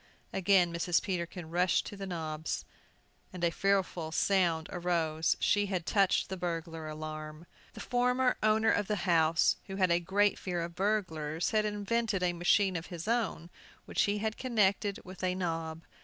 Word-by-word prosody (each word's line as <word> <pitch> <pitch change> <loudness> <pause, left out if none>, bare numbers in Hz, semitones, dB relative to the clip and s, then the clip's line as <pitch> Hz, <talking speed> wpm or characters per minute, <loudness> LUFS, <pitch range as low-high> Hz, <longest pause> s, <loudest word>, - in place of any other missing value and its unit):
Again 185 -2 +3
Mrs. 170 0 +2
Peterkin 170 -3 -4
rushed 180 +1 +2
to - - -7
the 195 -1 -6
knobs, 160 -3 -4 0.7
and 180 -2 -7
a 170 - +3
fearful 185 -4 0
sound 170 -3 +2
arose. 165 -3 0
She 205 0 +2
had 185 -4 -2
touched 195 -1 +2
the 190 - -5
burglar 165 -2 -4
alarm! 155 +1 -7 0.3
The - - -8
former 250 +1 +2
owner 220 +1 +3
of 205 -1 0
the 210 - 0
house, 165 -2 +3
who 190 - -5
had 185 -2 +2
a 170 - +4
great 200 +4 +1
fear 175 -2 -2
of 170 0 -6
burglars, 170 -6 -1
had 215 -1 +2
invented 210 -1 -1
a 175 -1 +2
machine 185 +2 +2
of 165 0 -4
his 170 -1 -7
own, 220 -7 -1 0.3
which - - 0
he 205 0 +1
had 220 +1 -2
connected 205 -5 +1
with 185 0 -10
a 180 0 +1
knob. 165 -3 -3
180 Hz, 170 wpm, -31 LUFS, 165-205 Hz, 0.7 s, a